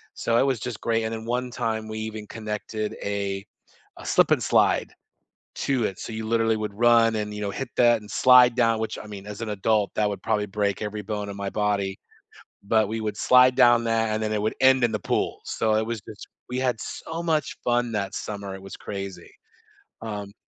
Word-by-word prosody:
so, 115 Hz, 0 st, +1 dB
it 135 Hz, -, +4 dB
was 130 Hz, -5 st, 0 dB
just 120 Hz, -1 st, -6 dB
great, 115 Hz, -1 st, 0 dB
and 110 Hz, +1 st, -2 dB
then 110 Hz, 0 st, -5 dB
one 125 Hz, +1 st, -2 dB
time, 110 Hz, -2 st, -2 dB
we 110 Hz, 0 st, -5 dB
even 110 Hz, -1 st, -5 dB
connected 110 Hz, 0 st, -4 dB
a 100 Hz, -1 st, -2 dB, 0.5 s
a -, -, -11 dB
Slip -, -, +3 dB
'N -, -, +4 dB
Slide -, -, +2 dB, 0.7 s
to 130 Hz, -5 st, +1 dB
it, 95 Hz, -, -3 dB
so 115 Hz, -, -6 dB
you 110 Hz, 0 st, -4 dB
literally 115 Hz, -1 st, +2 dB
would 105 Hz, -1 st, -4 dB
run, 115 Hz, 0 st, +4 dB
and, 105 Hz, -1 st, -3 dB
you 105 Hz, -, -6 dB
know, 100 Hz, -, -2 dB
hit 135 Hz, +3 st, -5 dB
that, 120 Hz, -2 st, +5 dB
and 105 Hz, -, -12 dB
slide 125 Hz, -1 st, +6 dB
down 115 Hz, -2 st, +3 dB
which, 110 Hz, -, -3 dB
I -, -, -11 dB
mean, 100 Hz, -2 st, -9 dB
as 105 Hz, +2 st, -7 dB
an 110 Hz, -, -3 dB
adult, 105 Hz, 0 st, +1 dB
that 105 Hz, -1 st, +2 dB
would 100 Hz, -2 st, -5 dB
probably 105 Hz, -2 st, +1 dB
break 100 Hz, 0 st, -1 dB
every 105 Hz, 0 st, -4 dB
bone 105 Hz, 0 st, -4 dB
in 100 Hz, -, -6 dB
my 100 Hz, -1 st, -3 dB
body, 100 Hz, -2 st, -1 dB, 0.6 s
but 110 Hz, +1 st, +2 dB
we 110 Hz, 0 st, -3 dB
would 105 Hz, -1 st, -3 dB
slide 125 Hz, 0 st, +5 dB
down 120 Hz, -2 st, +5 dB
that, 115 Hz, -1 st, +1 dB
and 110 Hz, 0 st, -1 dB
then 110 Hz, -, -1 dB
it 105 Hz, -, 0 dB
would 110 Hz, -, 0 dB
end 130 Hz, -1 st, +5 dB
in 120 Hz, -, +3 dB
the 105 Hz, -, -1 dB
pool, -, -, -1 dB
so 110 Hz, -1 st, 0 dB
it 110 Hz, +1 st, +1 dB
was 115 Hz, -2 st, -3 dB
just 105 Hz, -, -10 dB, 0.2 s
we 125 Hz, +1 st, -2 dB
had 125 Hz, -3 st, 0 dB
so 165 Hz, +1 st, -6 dB
much 155 Hz, -5 st, 0 dB
fun 120 Hz, -1 st, +1 dB
that 100 Hz, -2 st, -2 dB
summer, 100 Hz, -2 st, -5 dB
it 95 Hz, -, -10 dB
was 95 Hz, -, -9 dB
crazy, 100 Hz, -2 st, -7 dB, 0.7 s
um 105 Hz, -3 st, -6 dB
110 Hz, 225 wpm, -25 LUFS, 105-120 Hz, 0.7 s, slide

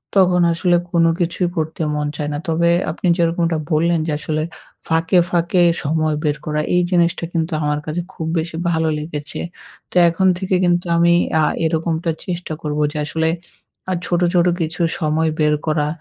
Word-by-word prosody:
তখন 180 Hz, -2 st, +4 dB
আসলে 175 Hz, +1 st, +2 dB, 0.2 s
কোনো 165 Hz, -1 st, +4 dB
কিছুই 175 Hz, +1 st, 0 dB
করতে 160 Hz, +1 st, -2 dB
মন 150 Hz, 0 st, -1 dB
চায় 150 Hz, -1 st, -3 dB
না। -, -, -2 dB
তবে 170 Hz, +1 st, +2 dB, 0.2 s
আপনি 175 Hz, -, -3 dB
যেরকমটা 170 Hz, -1 st, +1 dB
বললেন 165 Hz, +2 st, +2 dB
আসলে 155 Hz, -, -4 dB
যে, -, -, 0 dB
আসলে 155 Hz, 0 st, -2 dB, 0.4 s
ফাঁকে, 165 Hz, +2 st, +2 dB
ফাঁকে 175 Hz, +1 st, +2 dB, 0.2 s
সময় 155 Hz, +1 st, 0 dB
বের 150 Hz, -1 st, 0 dB
করা, 150 Hz, 0 st, -1 dB
এই 180 Hz, -, +4 dB
জিনিসটা 175 Hz, 0 st, +2 dB
কিন্তু 165 Hz, 0 st, -1 dB
আমার 150 Hz, 0 st, 0 dB
কাছে 155 Hz, +3 st, -2 dB
খুব 160 Hz, -, -5 dB
বেশি 160 Hz, +1 st, -3 dB
ভালো 160 Hz, -1 st, +1 dB
লেগেছে। 150 Hz, +1 st, -6 dB, 0.5 s
তো -, -, -16 dB
এখন 190 Hz, +3 st, +1 dB
থেকে 190 Hz, 0 st, -1 dB
কিন্তু 175 Hz, 0 st, +2 dB
আমি 170 Hz, 0 st, +4 dB, 0.3 s
আ -, -, +3 dB, 0.2 s
এরকমটা 165 Hz, +1 st, 0 dB
চেষ্টা 175 Hz, -3 st, -4 dB
করবো। 150 Hz, 0 st, -2 dB
যে 150 Hz, -, -6 dB
আসলে 160 Hz, +1 st, -1 dB, 0.6 s
আ -, -, +2 dB
ছোট, 175 Hz, 0 st, 0 dB
ছোট 175 Hz, -1 st, +4 dB
কিছু 165 Hz, +2 st, -3 dB, 0.2 s
সময় 160 Hz, +1 st, +1 dB
বের 150 Hz, -1 st, +3 dB
করা 155 Hz, -1 st, +1 dB
165 Hz, 175 wpm, -19 LUFS, 155-175 Hz, 0.6 s, তখন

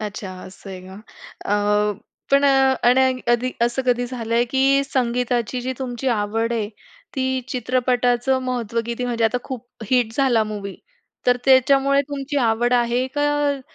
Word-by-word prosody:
अच्छा 205 Hz, -2 st, -6 dB
असं 190 Hz, +1 st, -11 dB
आहे 185 Hz, -1 st, -8 dB
का? 190 Hz, +1 st, -12 dB, 0.5 s
अ, 210 Hz, 0 st, +1 dB, 0.4 s
पण 280 Hz, +1 st, +4 dB
अ, 270 Hz, -1 st, +4 dB
आणि 260 Hz, 0 st, +3 dB
कधी 240 Hz, +1 st, +1 dB
असं 240 Hz, +3 st, +1 dB
कधी 245 Hz, 0 st, +1 dB
झालंय 235 Hz, -1 st, -1 dB
की 275 Hz, +1 st, +3 dB
संगीताची 245 Hz, -2 st, -1 dB
जी 255 Hz, +1 st, -3 dB
तुमची 255 Hz, 0 st, -3 dB
आवड 225 Hz, +1 st, 0 dB
आहे, 220 Hz, -3 st, -1 dB, 0.5 s
ती 260 Hz, -1 st, -1 dB
चित्रपटाचं 250 Hz, 0 st, +1 dB
महत्व 235 Hz, -3 st, -2 dB
किती? 235 Hz, +1 st, -3 dB
म्हणजे 235 Hz, -2 st, -1 dB
आता 245 Hz, +3 st, +1 dB
खूप 250 Hz, -2 st, -7 dB, 0.2 s
हिट 245 Hz, -3 st, +2 dB
झाला 245 Hz, -5 st, +3 dB
मूव्ही 205 Hz, -2 st, -6 dB, 0.5 s
तर 245 Hz, -, +4 dB
त्याच्यामुळे 270 Hz, +1 st, +4 dB
तुमची 285 Hz, 0 st, -4 dB
आवड 240 Hz, -1 st, +1 dB
आहे 240 Hz, +1 st, +1 dB
का, 290 Hz, -1 st, +1 dB
245 Hz, 150 wpm, -21 LUFS, 230-265 Hz, 0.5 s, पण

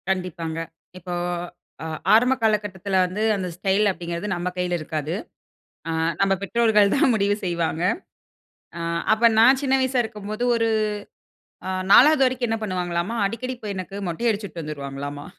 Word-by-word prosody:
கண்டிப்பாங்க. 180 Hz, -4 st, -2 dB, 0.4 s
இப்போ 180 Hz, 0 st, -6 dB, 0.7 s
அ -, -, -5 dB, 0.3 s
ஆரம்ப 245 Hz, +4 st, +5 dB
காலகட்டத்தில 205 Hz, -3 st, 0 dB
வந்து, 185 Hz, +4 st, -4 dB
அந்த 190 Hz, -2 st, -3 dB
ஸ்டைல் 195 Hz, +3 st, +1 dB
அப்பிடிங்கிறது 170 Hz, +1 st, -5 dB
நம்ம 175 Hz, 0 st, -3 dB
கையில 180 Hz, -1 st, -1 dB
இருக்காது. 155 Hz, 0 st, -4 dB, 0.8 s
ஆ, -, -, -1 dB, 0.3 s
நம்ம 195 Hz, 0 st, +3 dB
பெற்றோர்கள் 210 Hz, -1 st, +3 dB
தான் 270 Hz, -2 st, +4 dB
முடிவு 205 Hz, -1 st, +2 dB
செய்வாங்க. 170 Hz, -2 st, -1 dB, 1.0 s
ஆ, -, -, -4 dB, 0.3 s
அப்ப 230 Hz, +2 st, +4 dB
நான் 260 Hz, +4 st, +6 dB
சின்ன 270 Hz, -1 st, +2 dB
வயசா 260 Hz, -1 st, +1 dB
இருக்கும்போது, 215 Hz, 0 st, -5 dB
ஒரு 230 Hz, -1 st, +1 dB, 1.0 s
அ -, -, -1 dB, 0.2 s
4வது 295 Hz, +4 st, +7 dB
வரைக்கும் 255 Hz, -1 st, -1 dB
என்ன 225 Hz, 0 st, -1 dB
பண்ணுவாங்களாம்மா! 180 Hz, +1 st, -2 dB
அடிக்கடி 255 Hz, +5 st, -4 dB
இப்ப 215 Hz, -, -7 dB
எனக்கு 185 Hz, +1 st, -6 dB
மொட்டை 175 Hz, +8 st, -1 dB
அடிச்சுட்டு 200 Hz, -5 st, -4 dB
வந்துருவாங்களாம்மா! 145 Hz, -1 st, -6 dB
195 Hz, 140 wpm, -23 LUFS, 175-225 Hz, 1.0 s, 4வது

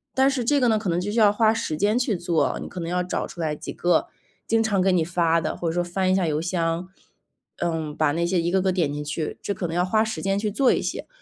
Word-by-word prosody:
但 265 Hz, +1 st, +4 dB
是 250 Hz, -3 st, -2 dB
这 290 Hz, +3 st, +3 dB
个 245 Hz, -, +4 dB
呢， 220 Hz, -1 st, +2 dB
可 210 Hz, -, -5 dB
能 170 Hz, +1 st, 0 dB
就 205 Hz, +3 st, -3 dB
需 230 Hz, -, 0 dB
要 210 Hz, -2 st, +5 dB
花 220 Hz, +1 st, +3 dB
时 160 Hz, -8 st, -2 dB
间 205 Hz, +8 st, +2 dB
去 245 Hz, -5 st, 0 dB
做， 170 Hz, -2 st, 0 dB
你 -, -, -6 dB
可 185 Hz, -, -7 dB
能 165 Hz, -, -4 dB
要 180 Hz, +1 st, 0 dB
找 180 Hz, -, -3 dB
出 170 Hz, -, -8 dB
来 155 Hz, -2 st, -1 dB
几 -, -, -7 dB
个 175 Hz, -, +1 dB, 0.4 s
经 225 Hz, 0 st, +2 dB
常 205 Hz, -4 st, +1 dB
给 190 Hz, -, +3 dB
你 170 Hz, -3 st, +3 dB
发 165 Hz, -1 st, +1 dB
的， -, -, -3 dB
或 170 Hz, -, -3 dB
者 165 Hz, -, 0 dB
说 175 Hz, 0 st, 0 dB
翻 185 Hz, +2 st, -1 dB
一 -, -, +4 dB
下 180 Hz, -3 st, +1 dB
邮 150 Hz, 0 st, 0 dB
箱， 170 Hz, 0 st, -1 dB, 0.7 s
嗯， 160 Hz, -3 st, -2 dB
把 155 Hz, -2 st, +2 dB
那 170 Hz, +3 st, -1 dB
些 175 Hz, +1 st, +1 dB
一 170 Hz, +1 st, 0 dB
个 190 Hz, 0 st, +2 dB
个 190 Hz, 0 st, +1 dB
点 165 Hz, -6 st, 0 dB
进 150 Hz, 0 st, -4 dB
去， 150 Hz, +1 st, -4 dB
这 200 Hz, -, -3 dB
可 185 Hz, -, -4 dB
能 165 Hz, -, -3 dB
要 175 Hz, -, +2 dB
花 215 Hz, +4 st, +2 dB
时 220 Hz, 0 st, -4 dB
间 195 Hz, 0 st, 0 dB
去 210 Hz, 0 st, -1 dB
做 255 Hz, +5 st, +3 dB
一 -, -, +1 dB
些。 -, -, -4 dB
180 Hz, 315 characters per minute, -24 LUFS, 165-210 Hz, 0.7 s, 要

